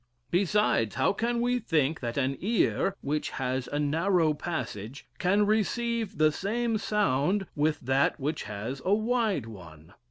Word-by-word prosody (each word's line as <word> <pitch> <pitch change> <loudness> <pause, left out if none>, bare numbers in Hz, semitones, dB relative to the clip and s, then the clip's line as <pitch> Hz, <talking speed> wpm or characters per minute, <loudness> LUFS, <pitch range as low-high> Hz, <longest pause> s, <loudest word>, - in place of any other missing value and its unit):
Besides, 180 - +2
how - - +2
can 235 +3 -1
we 245 +1 +1
think 160 - +1
that 120 0 -4
an 135 0 +1
ear, 200 -2 +1
which 150 +2 -2
has 130 -1 -2
a 145 - -3
narrow 160 +2 +2
passage, 140 - -5
can 200 +3 +3
receive 220 +1 0
the 155 0 +4
same 225 +6 -1
sound 195 -2 +1
with 150 0 +1
that 135 +4 +1
which 150 +3 -2
has 110 +6 -5
a 195 +2 +3
wide 220 - 0
one? 85 -5 -12
160 Hz, 150 wpm, -28 LUFS, 135-210 Hz, -, the